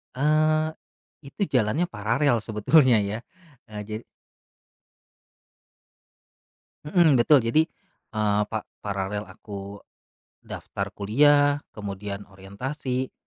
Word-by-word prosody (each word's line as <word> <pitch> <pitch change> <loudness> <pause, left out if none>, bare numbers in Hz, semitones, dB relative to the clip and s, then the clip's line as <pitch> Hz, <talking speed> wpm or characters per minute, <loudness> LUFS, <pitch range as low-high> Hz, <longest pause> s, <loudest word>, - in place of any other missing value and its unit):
Eee, 155 +3 +2 0.6
itu 170 - -11 0.2
jalannya 125 +12 +1
paralel 120 +6 +2
sebetulnya 120 +4 +4
ya, 110 - -3 0.5
eee, 105 -1 -7
jadi 110 +2 -5 2.8
Heeh, 155 -4 +4
betul 130 +3 +5
jadi, 150 +8 +3 0.5
eee, 105 -1 +1
pa 110 0 -4 0.2
paralel 100 +1 -3
aku 100 -1 -9 0.6
daftar - - -5
kuliah 145 +7 +4 0.2
kemudian 100 -1 -6
orientasi 125 +7 -4
115 Hz, 85 wpm, -25 LUFS, 105-145 Hz, 2.8 s, betul